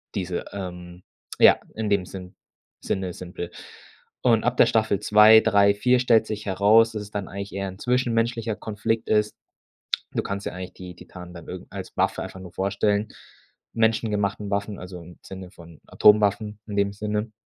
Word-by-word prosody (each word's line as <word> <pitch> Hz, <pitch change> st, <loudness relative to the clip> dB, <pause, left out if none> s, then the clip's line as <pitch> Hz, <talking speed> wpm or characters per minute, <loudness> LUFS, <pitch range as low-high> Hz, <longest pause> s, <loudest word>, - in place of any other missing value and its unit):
diese 90 Hz, -3 st, -3 dB
ähm, 90 Hz, -2 st, -8 dB, 0.4 s
ja, -, -, +7 dB, 0.2 s
in 110 Hz, -1 st, -2 dB
dem 100 Hz, -2 st, +1 dB
Sinn 90 Hz, -1 st, -10 dB, 0.5 s
Sinne 95 Hz, -2 st, -3 dB
simpel. 90 Hz, -1 st, -7 dB, 0.7 s
Und 115 Hz, -3 st, +3 dB
ab 125 Hz, 0 st, 0 dB
der -, -, +7 dB
Staffel 110 Hz, -4 st, +1 dB
2, 105 Hz, +1 st, +7 dB
3, 100 Hz, 0 st, +4 dB
4 125 Hz, +4 st, +3 dB
stellt 115 Hz, -3 st, +4 dB
sich 110 Hz, -1 st, -5 dB
heraus, 105 Hz, +4 st, +4 dB
dass 105 Hz, -1 st, -4 dB
es 105 Hz, -, -13 dB
dann 100 Hz, -2 st, -4 dB
eigentlich 100 Hz, 0 st, -7 dB
eher 100 Hz, 0 st, -3 dB
'n 95 Hz, -, -11 dB
zwischenmenschlicher 115 Hz, -2 st, 0 dB
Konflikt 110 Hz, +2 st, -3 dB
ist. 105 Hz, 0 st, +1 dB, 0.8 s
Du -, -, 0 dB
kannst 100 Hz, +1 st, -5 dB
dir -, -, -3 dB
eigentlich 90 Hz, 0 st, -8 dB
die 90 Hz, -1 st, -10 dB
Titanen 90 Hz, 0 st, -12 dB
dann 85 Hz, -2 st, -11 dB
irgend -, -, -9 dB
als -, -, -8 dB
Waffe -, -, 0 dB
einfach -, -, -8 dB
nur 90 Hz, -2 st, -11 dB
vorstellen, 100 Hz, +2 st, 0 dB, 0.7 s
menschengemachten 105 Hz, -3 st, 0 dB
Waffen, 100 Hz, 0 st, -2 dB
also 90 Hz, -1 st, -9 dB
im 85 Hz, +1 st, -14 dB
Sinne 95 Hz, -1 st, -9 dB
von 85 Hz, -4 st, -15 dB
Atomwaffen 105 Hz, 0 st, +3 dB
in 105 Hz, -, -5 dB
dem 100 Hz, 0 st, +1 dB
Sinne. 105 Hz, +1 st, -3 dB
100 Hz, 170 wpm, -24 LUFS, 95-110 Hz, 0.8 s, ja